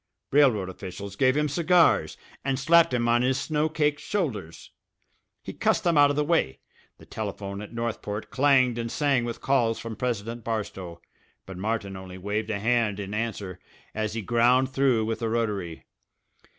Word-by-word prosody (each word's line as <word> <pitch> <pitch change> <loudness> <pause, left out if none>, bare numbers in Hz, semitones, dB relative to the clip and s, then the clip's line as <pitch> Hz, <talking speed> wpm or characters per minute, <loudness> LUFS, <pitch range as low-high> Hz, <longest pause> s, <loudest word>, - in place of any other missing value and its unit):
Railroad 130 -9 +4
officials 95 +1 -8
gave 130 +4 +3
him 150 0 +2
cigars, 165 - +3 0.3
and 135 -1 0
slapped 165 +4 +5
him 120 -1 0
on 120 +1 +3
his 130 +1 +1
snow 150 +3 0
caked 150 -2 0
shoulders. 120 - -4 0.7
He - - -7
cussed - - +1
them 170 -2 +2
out 145 -1 +6
of 145 - 0
the 150 - +1
way. 145 - +1 0.4
The - - -16
telephone 100 -2 -5
at 105 - -9
Northport 115 -3 -4
clanged 130 -3 +3
and 115 0 -3
sang 140 -5 +1
with 120 0 -5
calls 120 -5 +2
from 115 -1 -6
President 115 -1 -3
Barstow; 95 -6 -5 0.4
but 95 - -9
Martin 105 -1 -2
only 95 -1 -9
waved 105 +3 -3
a 105 - -1
hand 115 -2 +1
in 100 0 -5
answer 105 -4 -4 0.3
as 110 0 -3
he 115 - -3
ground 120 +4 +3
through 130 -5 +2
with 115 0 -2
the 115 -2 -2
rotary. 105 -8 -2
115 Hz, 170 wpm, -26 LUFS, 105-135 Hz, 0.7 s, out